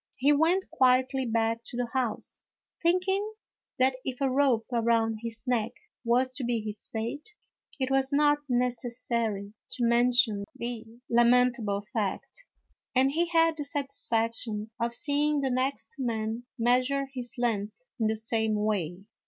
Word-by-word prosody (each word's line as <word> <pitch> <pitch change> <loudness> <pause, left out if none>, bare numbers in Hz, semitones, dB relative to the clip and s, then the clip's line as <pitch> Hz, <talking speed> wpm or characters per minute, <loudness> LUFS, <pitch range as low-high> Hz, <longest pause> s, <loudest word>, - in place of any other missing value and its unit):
He 280 +3 +3
went 335 +6 +2
quietly 260 0 +3
back 230 0 0
to 240 - -7
the 245 -1 -1
house, 250 -5 -2 0.4
thinking 380 +5 +1 0.4
that 260 0 +2
if 255 -1 -4
a 270 -2 +1
rope 260 -4 +2
around 230 -1 +2
his 230 -1 -5
neck 240 -2 0 0.3
was 250 +2 +2
to 255 0 -5
be 235 -1 0
his 215 -1 -5
fate 285 - -5 0.4
it 260 0 -1
was 270 0 +2
not 295 +1 +4
necessary 235 -4 -1 0.2
to 245 - -3
mention 235 -3 +3
the 235 -1 -4 0.2
lamentable 235 -4 +3
fact, 220 - -3 0.5
and 265 +2 +4
he 340 +4 +1
had 330 -1 +3
the 295 - -3
satisfaction 230 -6 -1
of 235 0 0
seeing 290 +1 +1
the 265 -1 0
next 260 +4 -1
man 230 -1 -2
measure 255 +4 +2
his 245 -2 -3
length 225 - -2
in 220 - +2
the 220 - +1
same 220 0 0
way. 195 -4 -1
245 Hz, 145 wpm, -28 LUFS, 225-270 Hz, 0.5 s, not